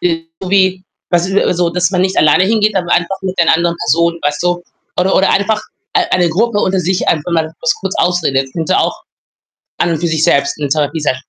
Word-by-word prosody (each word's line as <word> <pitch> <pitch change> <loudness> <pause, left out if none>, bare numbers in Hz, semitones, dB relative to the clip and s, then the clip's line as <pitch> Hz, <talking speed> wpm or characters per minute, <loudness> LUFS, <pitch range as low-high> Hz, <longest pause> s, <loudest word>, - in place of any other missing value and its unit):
irgendwie, 180 +3 0 0.3
was 175 0 +2
ist 195 - -3
also, 175 -1 +1
dass 180 0 0
man 180 - 0
nicht 190 0 -1
alleine 155 +5 +4
hingeht, 215 0 +1
aber 175 -2 -2
einfach 175 +3 +1
mit 190 -1 -4
den 170 - +3
anderen 170 +1 +2
Personen, 170 +1 +1
weißt 145 +2 -1
du? 175 0 0 0.4
Oder 190 +1 +1
Oder 195 - +3
einfach 210 +2 +1 0.3
ei 370 -4 +1
eine 175 -2 +3
Gruppe 215 +4 0
unter 190 -2 +1
sich, 180 +2 -1
einfach 160 +2 0
mal 160 -1 0
das 245 -1 +1
kurz 190 -1 -3
ausredet. 160 -7 +1
Könnte 165 -2 0
auch - - -1 0.8
an 170 - +1
und 160 - -1
für 170 - -1
sich 160 -1 0
selbst 140 0 +2
'ne 145 -2 -2
Therapie 150 +2 0
sein, 140 -3 0
175 Hz, 215 wpm, -14 LUFS, 160-190 Hz, 0.8 s, alleine